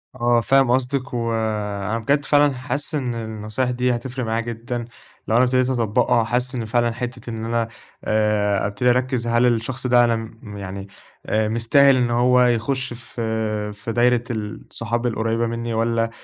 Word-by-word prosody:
آه، 120 -1 +2
فاهم 135 +1 +3
قصدِك 130 +1 0
وأنا 110 -2 -2
بجد 140 +6 +1
فعلًا 145 -1 +4
حاسس 140 +4 -3
إن 125 -5 -2
النصايح 110 +2 -3
دي 125 0 +1
هتفرق 125 +1 -4
معايا 110 +1 0
جدًا 120 +1 -5 0.4
لو 110 - +1
أنا 120 - +5
ابتديت 130 0 +2
أطبّقها، 120 0 +2
وحاسس 125 +3 -1
إن 120 -2 -3
فعلًا 120 +1 +1
حتّة 120 +1 -6
إن 115 -1 -5
أنا 115 0 0 0.4
آآ 105 -2 +1
ابتدي 100 +5 0
أركّز 125 -1 +1
هل 120 +1 +3
الشخص 120 +2 0
ده 120 -1 +5
أنا 120 -1 +2
م 110 -2 -8
يعني 100 0 -6 0.4
آآ 110 0 +1
مستاهل 130 +5 +4
إن 125 -2 +1
هو 125 +1 +4
يخُش 125 +2 0
في 110 -3 -3
في 105 +2 -6
دايرة 120 +1 +3
ال 105 -2 -5
صحاب 115 +1 -2
القريّبة 115 0 0
منّي، 115 0 -3
والّا 115 0 +1
115 Hz, 165 wpm, -22 LUFS, 110-125 Hz, 0.4 s, أنا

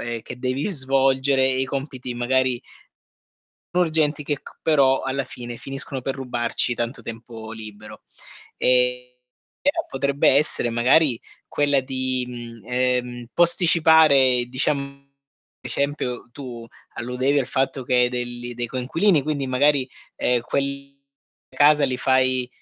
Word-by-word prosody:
ehm, 120 0 -4
che 125 - -9
devi 130 +8 -2
svolgere 135 -2 +2
e 130 0 +1
i - - +1
compiti 135 -2 -5
magari 125 0 0 1.1
urgenti 155 -4 +1
che 145 0 -1
c - - -14
però 135 -4 +3
alla 135 +1 -2
fine 120 -1 -8
finiscono 135 +1 -6
per 135 +2 -3
rubarci 125 -2 -1
tanto 120 0 -4
tempo 115 -1 -9
libero. 105 -1 -10 0.5
Ehm, 125 0 +2 0.5
però 310 +3 0
potrebbe 140 +1 +1
essere 140 -3 +3
magari 125 +2 +3 0.3
quella 145 -1 +2
di, 130 -1 -2
mhmm, 120 -2 -9
ehm, 125 -1 -1
posticipare, 160 -7 +5
diciam 130 +4 0
ad 140 0 -10 0.5
esempio 140 -4 -3
tu 120 -3 -8 0.3
alludevi 130 +4 0
al 130 - -3
fatto 135 0 -1
che 125 - -1
hai 125 0 +4
delli 120 0 -5
dei 120 0 -3
coinquilini, 145 - +1
quindi 145 -2 -2
magari, 135 +1 +2 0.3
ehm, 125 -1 +1
quelli 140 +1 -3 0.6
a - - -16
casa 145 0 +5
li 130 -2 0
fai 130 -1 +2
130 Hz, 135 wpm, -22 LUFS, 125-140 Hz, 1.1 s, posticipare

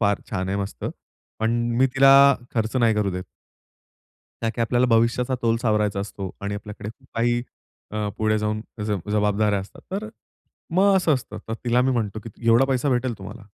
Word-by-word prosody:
फार 105 -2 +2
छान 95 0 -2
आहे 95 - -1
मस्त. 100 0 -5 0.6
पण 110 0 +2 0.3
मी 130 - +5
तिला 135 0 +7 0.4
खर्च 110 +1 0
नाही 115 -3 +3
करू 105 -2 +1
देत. 90 0 -4 1.2
ताकी 115 +1 -2
आपल्याला 120 +2 +2
भविष्याचा 120 +2 +2
तोल 115 -1 +2
सावरायचा 105 -3 +1
असतो 100 -1 -5
आणि 100 0 -3
आपल्याकडे 105 0 -7
खूप - - -20
काही 120 +1 +1 0.5
अ, 105 0 -2
पुढे 110 0 +2
जाऊन 105 0 -1 0.2
जब 105 -3 -3
जबाबदाऱ्या 105 0 +2
असतात. 95 +1 -12
तर 210 +3 -3 0.7
मग 195 +2 +5
असं 170 -5 +3
असतं. 130 -3 -6
तर 110 - -2
तिला 120 0 +3
मी 130 - +2
म्हणतो, 110 -4 -1
की 115 - -7 0.2
"एवढा 115 +3 +6
पैसा 135 +1 +1
भेटेल 125 -1 +1
तुम्हाला." 105 +3 -9
110 Hz, 175 wpm, -23 LUFS, 105-120 Hz, 1.2 s, तिला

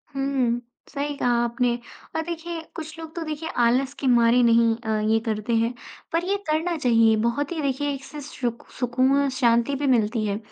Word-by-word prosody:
हुँ, 265 -3 0 0.3
सही 290 0 -3
कहा 245 - +1
आपने। 240 0 +1 0.4
और 320 - +1
देखिए, 335 0 -5
कुछ 320 0 -7
लोग 320 -1 -9
तो 340 - -4
देखिए 310 +1 -4 0.2
आलस 260 +3 +2
के 270 - -1
मारे 240 0 +5
नहीं 230 -1 +4
अ, 220 -2 -2
ये 225 - +4
करते 220 +1 -2
हैं, 230 +2 +1 0.4
पर 335 +1 +1
ये 395 +2 +1
करना 325 +3 +1
चाहिए, 230 -5 +4
बहुत 280 +6 -1
ही 325 -3 -2
देखिए 285 +1 -1
इससे 280 +2 -8
सु 265 -3 -3 0.3
सुकून 255 +2 +2
और 280 - +1
शांति 235 +2 +3
भी 280 +1 -1
मिलती 225 -3 +2
है। 200 -1 -1
260 Hz, 190 wpm, -24 LUFS, 235-295 Hz, 0.4 s, मारे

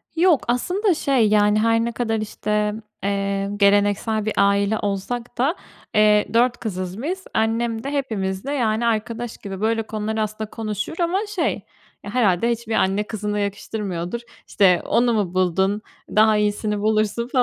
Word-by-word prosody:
Yok. 335 -3 +4
Aslında 360 - +1
şey 260 -8 +2
yani 210 0 +4
her 230 +1 +2
ne 235 - -2
kadar 225 -1 -1
işte, 210 0 -1 0.3
eee, 200 0 -1
geleneksel 205 +2 +2
bir 215 - -1
aile 200 +2 +3
olsak 230 +5 -3
da, 280 +9 +1 0.4
eee, 210 0 +5
4 240 +1 +3
kızız 185 0 -4
biz. 375 +4 -3
Annem 225 0 0
de 275 - -3
hepimizle 220 -3 -2
yani 230 -3 0
arkadaş 230 +1 -2
gibi, 195 -1 -7
böyle 225 0 +1
konuları 220 0 -3
aslında 215 0 -3
konuşur 215 +6 -4
ama 345 +3 +1 0.2
şey 340 - -1 0.4
Ya, 205 - -7
herhâlde 230 -2 +2
hiçbir 230 -1 -3
anne 195 +1 +2
kızına 210 -1 -3
yakıştırmıyordur. 200 -1 -3 0.3
İşte, 180 -3 +4
onu 240 0 +2
mu 200 -5 0
buldun? 190 +3 +1 0.3
Daha 215 0 +4
iyisini 210 0 0
bulursun 215 +2 0
215 Hz, 150 wpm, -22 LUFS, 205-235 Hz, 0.4 s, eee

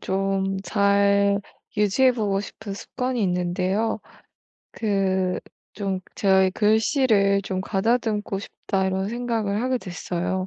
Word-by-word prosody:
좀 195 0 -1
잘 200 +1 +3 0.4
유지해 215 +5 +4
보고 205 -5 0
싶은 205 0 -7
습관이 250 +3 -3
있는데요. 185 +4 0 0.7
그 190 -3 0 0.3
좀 195 -3 -2
제가 190 -1 +4
이 190 - +2
'글씨를 215 -2 +3
좀 190 -1 -3
가다듬고 210 0 0
싶다.' 195 -1 -2
이런 190 +1 -1
생각을 230 -4 -1
하게 255 +1 +1
됐어요. 185 -2 -3
200 Hz, 235 characters per minute, -24 LUFS, 190-220 Hz, 0.7 s, 유지해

